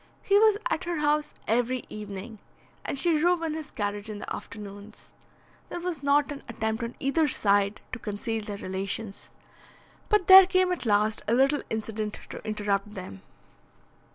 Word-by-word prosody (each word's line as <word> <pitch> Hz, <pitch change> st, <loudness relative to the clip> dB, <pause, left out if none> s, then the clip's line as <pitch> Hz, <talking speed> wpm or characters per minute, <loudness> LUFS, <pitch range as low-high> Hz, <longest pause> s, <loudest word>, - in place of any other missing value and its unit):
He 400 Hz, +1 st, +4 dB
was 430 Hz, -1 st, +5 dB
at 375 Hz, -, -2 dB
her 345 Hz, 0 st, -2 dB
house 300 Hz, 0 st, 0 dB
every 245 Hz, +2 st, +1 dB
evening, 210 Hz, +1 st, -8 dB, 0.4 s
and -, -, -3 dB
she 315 Hz, +2 st, +4 dB
drove 345 Hz, +1 st, +2 dB
in 320 Hz, -2 st, -1 dB
his 310 Hz, -2 st, -6 dB
carriage 205 Hz, +1 st, -3 dB
in 210 Hz, -, -5 dB
the -, -, -5 dB
afternoons. 205 Hz, 0 st, -10 dB, 0.6 s
There -, -, -5 dB
was 345 Hz, -4 st, -4 dB
not 285 Hz, +1 st, +2 dB
an 280 Hz, -, -6 dB
attempt 220 Hz, -1 st, -2 dB
on 235 Hz, +1 st, -4 dB
either 295 Hz, +3 st, +2 dB
side 205 Hz, -5 st, +2 dB
to 255 Hz, -, -5 dB
conceal 220 Hz, +1 st, -3 dB
their 205 Hz, -1 st, -6 dB
relations; 195 Hz, +2 st, -5 dB, 0.8 s
but 420 Hz, -4 st, +3 dB
there 380 Hz, 0 st, +10 dB
came 370 Hz, -1 st, +2 dB
at 295 Hz, -10 st, -3 dB
last 210 Hz, 0 st, +2 dB
a 230 Hz, -, +3 dB
little 275 Hz, +3 st, +3 dB
incident 220 Hz, -1 st, -3 dB
to -, -, -8 dB
interrupt 210 Hz, -1 st, -2 dB
them. 140 Hz, -, -8 dB
225 Hz, 165 wpm, -27 LUFS, 205-300 Hz, 0.8 s, there